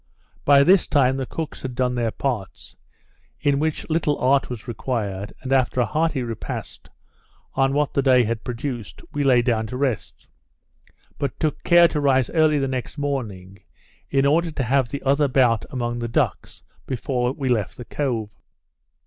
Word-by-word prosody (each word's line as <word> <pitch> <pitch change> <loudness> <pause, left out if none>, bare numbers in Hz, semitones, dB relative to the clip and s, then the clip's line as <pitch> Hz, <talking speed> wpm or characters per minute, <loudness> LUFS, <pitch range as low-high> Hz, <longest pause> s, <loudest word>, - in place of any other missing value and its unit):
By 140 -1 +7
this 185 +4 +4
time, 135 -3 +3
the 135 -2 -3
cooks 160 -2 -5
had 130 -2 -5
done 125 0 +1
their 120 -2 0
parts, 110 -5 -4 0.6
in 140 -1 +1
which 155 0 -2
little 155 -2 +1
art 135 +2 +2
was 125 -1 -7
required; 105 -4 -3
and 135 0 -1
after 130 -1 +2
a 120 - +3
hearty 155 -3 0
repast, 115 -3 -6 0.6
on 135 0 +2
what 145 0 0
the 140 - +2
day 130 -2 +5
had 115 0 -3
produced, 120 -2 -5
we 145 -1 0
lay 125 -3 +4
down 110 -2 0
to 125 - -5
rest; 130 -5 -3 0.9
but 140 -2 -3
took 155 -2 -1
care 175 -1 +6
to 150 - -2
rise 130 -3 +2
early 155 -2 +3
the 135 -1 0
next 130 +2 -4
morning, 105 -10 -4 0.5
in 135 0 +2
order 165 +4 +3
to 145 -4 -3
have 130 0 +1
the 140 - -5
other 140 +2 +3
bout 125 -5 +2
among 120 -2 -3
the 120 - -2
ducks, 115 - -2 0.2
before 125 -1 -1
we 135 -1 -4
left 115 -5 0
the 120 - -8
cove. 115 -8 -2
130 Hz, 175 wpm, -23 LUFS, 120-140 Hz, 0.9 s, By